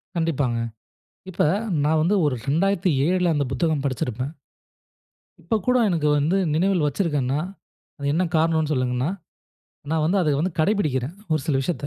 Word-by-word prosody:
கண்டிப்பாங்க. 145 -8 0 0.7
இப்ப 185 - 0 0.4
நான் 155 +2 +2
வந்து 180 +6 +2
1 145 -3 +1
2007ல 175 0 +2
அந்த 145 -1 +1
புத்தகம் 155 0 0
படிச்சிருப்பேன். 130 0 -2 1.1
இப்ப 225 - -1
கூட 250 0 +3
எனக்கு 165 -4 0
வந்து 155 +7 +1 0.2
நினைவில் 180 0 +2
வச்சிருக்கேன்னா, 145 -4 0 0.6
அது 140 - -5
என்ன 170 +4 +2
காரணம்னு 160 -1 +1
சொல்லணுன்னா 125 +1 0 0.8
நான் 160 -1 +1
வந்து 195 +4 +2
அத 155 -4 +2
வந்து 180 +3 -1
கடைபிடிக்கிறேன். 155 - 0 0.2
1 155 - +2
சில 140 -4 +1
விஷயத்த. 145 -1 -3
155 Hz, 135 wpm, -23 LUFS, 140-175 Hz, 1.1 s, கூட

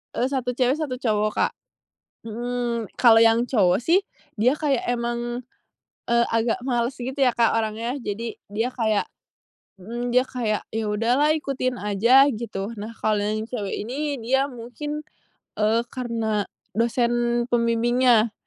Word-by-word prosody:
Eee, 245 - +1
1 260 -2 -1
cewek, 250 +1 +1
1 290 -5 -4
cowok, 215 -3 +1
Kak. - - +2 0.7
Mhm. 235 0 -3
Kalau 230 -2 +6
yang 225 +1 +5
cowok 195 -8 +3
sih, 340 +8 +4 0.4
dia 250 +6 +4
kayak 290 -4 0
emang, 240 0 -2 0.7
eee, 235 0 +4
agak 230 +2 +1
males 245 0 0
gitu 255 +1 -5
ya, 255 -2 +4
Kak, 235 -1 +3
orangnya. 225 +3 -2
Jadi, 225 0 -4
dia 225 +5 -2
kayak 220 -4 +1 0.7
mhm, 235 +5 -5
dia 250 - +6
kayak, 240 -5 -2
"Ya, 225 0 -2
udahlah 240 +8 +2
ikutin 270 -4 -2
aja." 235 +7 +5
Gitu. 220 -5 -4 0.2
Nah, 215 +3 -6
kalau 215 -1 0
yang 215 +2 -2
cewek 210 -6 -3
ini 275 +4 -3
dia 265 +4 +2
mungkin, 280 +4 -6 0.5
eee, 220 +2 +1
karena 230 -4 -1 0.3
dosen 240 +1 +1
pembimbingnya. 235 -1 +3
235 Hz, 140 wpm, -24 LUFS, 225-255 Hz, 0.7 s, Kalau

